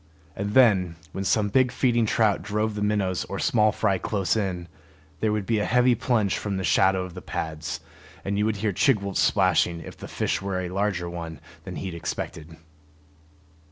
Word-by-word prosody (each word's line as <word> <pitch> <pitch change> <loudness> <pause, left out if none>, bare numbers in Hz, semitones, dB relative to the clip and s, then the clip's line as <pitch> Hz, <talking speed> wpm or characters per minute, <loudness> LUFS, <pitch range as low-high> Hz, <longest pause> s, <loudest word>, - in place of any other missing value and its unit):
And 100 +1 -3
then, 95 -9 +5 0.2
when 95 - -4
some 105 +1 +2
big 130 +3 +3
feeding 120 -3 +2
trout 110 -2 +2
drove 105 +3 -1
the 105 - -4
minnows 100 -3 0
or 100 - -5
small 110 -5 +3
fry 100 -2 0
close 100 +1 0
in, 90 -5 -2 0.5
there 110 - +1
would 105 -2 -1
be 110 0 +1
a 105 - 0
heavy 125 +1 +4
plunge 110 -4 +1
from 100 -2 -3
the 95 - -3
shadow 95 +1 +3
of 90 - -10
the - - -8
pads; 80 0 -4 0.4
and 100 - -1
you 105 +1 +1
would 110 -1 0
hear 105 0 -1
Chigwooltz 100 -4 +1
splashing 85 -1 +3
if - - -9
the - - -9
fish - - -1
were 95 -1 -2
a 90 -1 -3
larger 95 -2 -1
one 85 -3 -6 0.3
than 95 -2 -6
he 95 -3 -5
expected. 80 -1 -5
100 Hz, 190 wpm, -25 LUFS, 90-110 Hz, 0.5 s, then